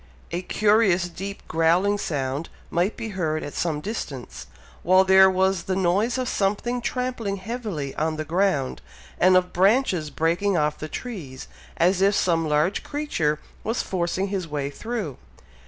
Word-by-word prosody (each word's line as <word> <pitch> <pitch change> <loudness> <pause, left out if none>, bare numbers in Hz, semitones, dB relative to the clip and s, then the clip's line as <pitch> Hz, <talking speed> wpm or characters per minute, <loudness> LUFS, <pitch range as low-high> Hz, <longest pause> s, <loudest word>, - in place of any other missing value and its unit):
A 175 +1 -2
curious 200 -3 +3
deep 195 +3 -7
growling 175 +6 +2
sound 140 -2 -2 0.2
might 175 +5 0
be 225 - -4
heard 160 -6 -2
at 145 - -6
some 155 -3 -1
distance, 150 - -6 0.3
while 185 +2 +5
there 190 0 +7
was 190 -1 +1
the 190 - -1
noise 195 +7 +1
of 255 -1 -1
something 215 +5 0
trampling 245 -5 -2
heavily 195 - -4
on 155 +1 -1
the 155 0 -4
ground, 170 -5 0 0.4
and 185 +1 +6
of 180 0 0
branches 190 - +2
breaking 175 +5 +1
off 150 -1 0
the 155 - -6
trees, 160 - -7 0.3
as 180 +2 +3
if 200 +1 +4
some 165 -4 +1
large 150 +6 +1
creature 230 - -1 0.3
was 225 +3 -1
forcing 185 +1 -1
his 190 -3 -3
way 145 -2 -3
through. 210 - -4
185 Hz, 155 wpm, -24 LUFS, 160-205 Hz, 0.4 s, there